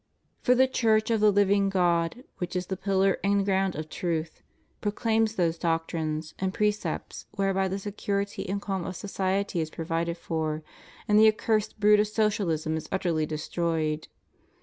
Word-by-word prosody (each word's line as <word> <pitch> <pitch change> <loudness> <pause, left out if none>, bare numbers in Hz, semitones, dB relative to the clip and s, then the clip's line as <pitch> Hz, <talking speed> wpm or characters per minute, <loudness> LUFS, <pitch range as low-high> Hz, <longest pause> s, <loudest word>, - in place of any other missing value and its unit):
For 250 - +4
the 260 +1 +5
Church 220 -3 +2
of 225 - +2
the 210 -1 +6
living 200 0 +3
God, 175 +3 +1 0.2
which 180 0 -4
is 180 0 -1
the 190 - -3
pillar 195 0 +1
and 200 0 +2
ground 190 -1 +1
of 155 +1 -5
truth,^ 160 -1 -3 0.4
pro 205 - 0
claims 220 0 +1
those 170 -3 0
doctrines 165 -2 -2
and 190 0 -1
precepts 210 0 -2
whereby 195 -1 +1
the 190 +1 -2
security 200 0 -3
and 200 +1 -1
cahn 195 -2 -3
of 185 - -5
society 195 -1 -1
is 160 - -3
provided 165 +1 -2
for, 155 -2 -3 0.4
and 210 0 +5
the 220 - +8
accursed 215 0 -1
brood 210 0 +6
of 210 - +3
Socialism 200 -8 0
is 155 - -7
utterly 170 -5 0
destroyed. 155 0 -2
190 Hz, 165 wpm, -27 LUFS, 165-205 Hz, 0.4 s, the